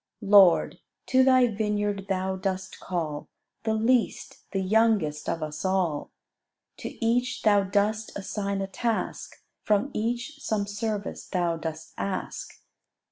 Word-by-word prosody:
Lord, 195 Hz, -3 st, +6 dB, 0.3 s
to 260 Hz, 0 st, +4 dB
Thy 255 Hz, -1 st, +6 dB
vineyard 205 Hz, -3 st, -1 dB
Thou 190 Hz, 0 st, 0 dB
dost 190 Hz, 0 st, -4 dB
call 155 Hz, -5 st, -4 dB, 0.4 s
The 220 Hz, -1 st, +1 dB
least, 230 Hz, +2 st, 0 dB
the 195 Hz, -, -1 dB
youngest 200 Hz, -7 st, +2 dB
of 165 Hz, -, -2 dB
us 155 Hz, 0 st, -5 dB
all: 185 Hz, -6 st, 0 dB, 0.7 s
To 230 Hz, -, -5 dB
each 245 Hz, +2 st, +1 dB
Thou 205 Hz, -2 st, +4 dB
dost 210 Hz, +3 st, 0 dB
assign 200 Hz, 0 st, -3 dB
a 195 Hz, -, -2 dB
task, 225 Hz, +3 st, -3 dB, 0.2 s
From 210 Hz, +6 st, +1 dB
each 240 Hz, +7 st, -2 dB
some 215 Hz, -7 st, -1 dB
service 205 Hz, 0 st, -4 dB
Thou 175 Hz, -2 st, 0 dB
dost 160 Hz, 0 st, -6 dB
ask. 195 Hz, -, -4 dB
200 Hz, 130 wpm, -27 LUFS, 185-220 Hz, 0.7 s, Lord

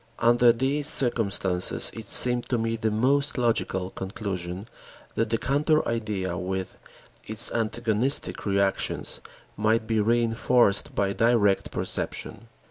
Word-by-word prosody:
Under 120 Hz, 0 st, +4 dB
these 135 Hz, +5 st, -1 dB
circumstances, 100 Hz, -9 st, +2 dB
it 110 Hz, -2 st, -9 dB
seemed 125 Hz, -1 st, +4 dB
to 125 Hz, -, 0 dB
me 115 Hz, 0 st, -2 dB
the 110 Hz, -1 st, -1 dB
most 140 Hz, +7 st, +1 dB
logical 105 Hz, -6 st, -1 dB
conclusion 95 Hz, -1 st, -6 dB, 0.5 s
that 115 Hz, -1 st, -1 dB
the 115 Hz, -, +1 dB
counter 150 Hz, +5 st, 0 dB
idea 105 Hz, -6 st, -3 dB
with 95 Hz, 0 st, -4 dB, 0.5 s
its 110 Hz, -1 st, +3 dB
antagonistic 115 Hz, +3 st, 0 dB
reactions 100 Hz, 0 st, -1 dB, 0.3 s
might 110 Hz, +2 st, 0 dB
be 110 Hz, 0 st, -1 dB
reënforced 115 Hz, 0 st, +1 dB
by 100 Hz, -1 st, 0 dB
direct 110 Hz, -3 st, +1 dB
perception. -, -, -4 dB
115 Hz, 120 wpm, -25 LUFS, 100-120 Hz, 0.5 s, Under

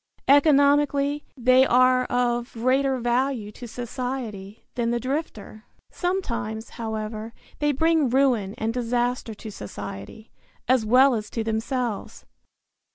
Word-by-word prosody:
Economically 285 Hz, 0 st, +4 dB
they 255 Hz, +1 st, +5 dB
are 255 Hz, 0 st, +4 dB
of 240 Hz, -1 st, -1 dB
greater 260 Hz, +3 st, +1 dB
value 240 Hz, -2 st, -1 dB
to 240 Hz, +3 st, -10 dB
society 235 Hz, -4 st, -6 dB
than 235 Hz, -1 st, -1 dB
the 240 Hz, 0 st, 0 dB
drifter. 255 Hz, -5 st, -5 dB, 0.3 s
Sometimes, 235 Hz, -, -3 dB
however, 220 Hz, -1 st, -5 dB, 0.3 s
they 295 Hz, 0 st, +2 dB
bring 320 Hz, 0 st, +2 dB
ruin 245 Hz, -6 st, +2 dB
and 225 Hz, +1 st, -2 dB
disaster 245 Hz, -1 st, -1 dB
to 215 Hz, +1 st, -9 dB
society, 100 Hz, -, -9 dB, 0.4 s
as 250 Hz, -3 st, +2 dB
well 260 Hz, +4 st, +6 dB
as 210 Hz, -3 st, -3 dB
to 225 Hz, -, -3 dB
themselves. 225 Hz, +1 st, -3 dB
245 Hz, 115 wpm, -24 LUFS, 220-270 Hz, 0.4 s, well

